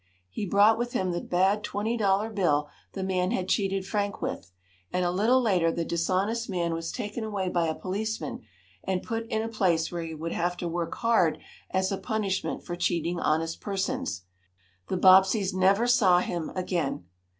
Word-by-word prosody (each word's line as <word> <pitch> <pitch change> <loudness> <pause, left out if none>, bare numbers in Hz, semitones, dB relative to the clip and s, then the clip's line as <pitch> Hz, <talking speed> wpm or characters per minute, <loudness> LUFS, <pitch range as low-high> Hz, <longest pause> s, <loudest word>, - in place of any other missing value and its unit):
He 200 - -4
brought 205 +4 +5
with 240 0 -2
him 185 -1 0
the 175 - -2
bad 190 +4 +1
twenty 215 +4 -2
dollar 205 0 +1
bill 150 -8 +1 0.2
the 190 - -4
man 185 -1 0
had 185 -1 -1
cheated 195 -1 0
Frank 205 0 -2
with, 90 - -5 0.4
and 180 0 0
a 175 - +1
little 220 +8 +3
later 185 -9 +2
the 170 0 -2
dishonest 190 +8 0
man 170 -3 -1
was 165 0 -3
taken 220 -1 -4
away 200 -4 -2
by 170 -2 +1
a 160 - -1
policeman, 215 +4 -4 0.4
and 185 -1 -1
put 230 -1 -3
in 220 -2 -1
a - - -2
place 180 -7 +1
where 175 -1 -3
he 165 -1 -5
would 165 +2 -4
have 175 +1 -1
to 175 - -3
work 170 0 -3
hard 225 -9 +2 0.3
as 190 +1 0
a 195 - -2
punishment 210 -4 -2
for 175 - -4
cheating 175 -1 -1
honest 165 +1 0
persons. 190 - -2 0.6
The 185 - -1
Bobbseys 190 +2 +5
never 195 +4 +3
saw 215 -7 +5
him 175 -2 -2
again. 175 - -2
190 Hz, 185 wpm, -27 LUFS, 175-210 Hz, 0.6 s, brought